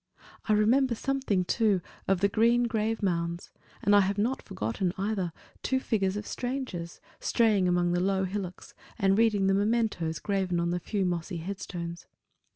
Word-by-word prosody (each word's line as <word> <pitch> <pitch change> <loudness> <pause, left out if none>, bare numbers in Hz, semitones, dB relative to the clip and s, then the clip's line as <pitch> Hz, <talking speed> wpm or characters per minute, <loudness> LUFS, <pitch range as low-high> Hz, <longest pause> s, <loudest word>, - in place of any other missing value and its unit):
I - - +5
remember 235 +4 +3
something, 240 -8 0
too, 210 -1 +2 0.3
of 190 -2 +2
the 200 - +5
green 230 +4 +3
grave 225 -1 -1
mounds; 170 -2 -1 0.3
and 205 +1 +5
I - - +8
have 200 +1 +1
not 235 +6 0
forgotten, 145 - -2
either, 195 -3 -1 0.3
two 260 - +1
figures 195 -6 0
of 210 - -5
strangers, 245 -11 -4 0.2
straying 215 -5 +3
among 175 0 +2
the 175 - +1
low 190 +1 +1
hillocks, 190 -1 -5 0.2
and 195 -3 +3
reading 215 -3 +3
the 195 - +3
mementos 205 -6 +1
graven 190 -2 -1
on 170 0 0
the 175 - -1
few 195 +2 -1
mossy 175 0 -2
headstones. 170 -1 -6
195 Hz, 165 wpm, -28 LUFS, 180-220 Hz, 0.3 s, I